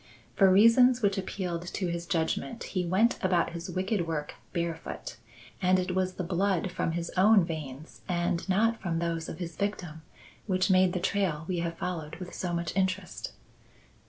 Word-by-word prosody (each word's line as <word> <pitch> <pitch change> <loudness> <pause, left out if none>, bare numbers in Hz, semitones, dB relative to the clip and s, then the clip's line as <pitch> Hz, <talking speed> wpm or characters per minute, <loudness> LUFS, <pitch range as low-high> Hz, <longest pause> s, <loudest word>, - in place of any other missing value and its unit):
For 195 -2 +6
reasons 235 +5 +6
which 200 -1 +2
appealed 180 -3 -4
to 190 +1 -3
his 170 0 -3
judgment, 170 +7 -1
he 180 -3 -2
went 215 +7 +2
about 180 -2 +2
his 170 +2 -6
wicked 185 0 -1
work 150 -2 -3 0.2
barefoot; 170 -2 -4 0.4
and 185 0 +4
it 185 0 -1
was 185 0 0
the 185 - -3
blood 185 0 0
from 165 - -1
his 170 0 -3
own 195 0 +5
veins 155 -3 -7
and 175 +1 -1
not 225 +4 +2
from 170 -3 -1
those 165 -1 -2
of - - -6
his 170 -2 -6
victim 180 -6 -3 0.5
which 185 0 +2
made 185 -1 +4
the 180 - -1
trail 185 -4 0
we 180 -2 -1
have 170 0 -3
followed 165 -3 -4
with 180 +1 -8
so 180 - -3
much 170 -1 -2
interest. 190 -1 -2
180 Hz, 175 wpm, -29 LUFS, 170-190 Hz, 0.5 s, For